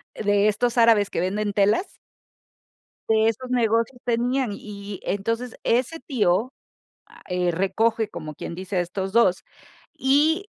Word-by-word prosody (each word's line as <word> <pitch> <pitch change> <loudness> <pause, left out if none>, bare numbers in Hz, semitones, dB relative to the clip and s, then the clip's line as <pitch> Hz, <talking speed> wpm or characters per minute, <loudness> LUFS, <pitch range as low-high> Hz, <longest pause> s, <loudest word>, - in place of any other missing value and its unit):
de 205 0 +2
estos 240 +3 0
árabes 225 -3 +5
que - - -3
venden 205 +4 -1
telas 205 - +1 1.1
de 220 0 +4
esos 230 +3 -2
negocios 230 0 +1
tenían 245 +1 0
y, 200 -1 -8
entonces 230 +5 -2
ese 255 +7 0
tío, 225 - 0 0.5
ah, - - -18 0.3
recoge, 220 +5 +1
como 155 -6 -8
quien 170 - -7
dice, 185 +1 -5
a - - +3
estos 190 +2 -4
dos 200 -5 +3 0.5
y, 310 +8 +2
220 Hz, 130 wpm, -24 LUFS, 200-245 Hz, 1.1 s, árabes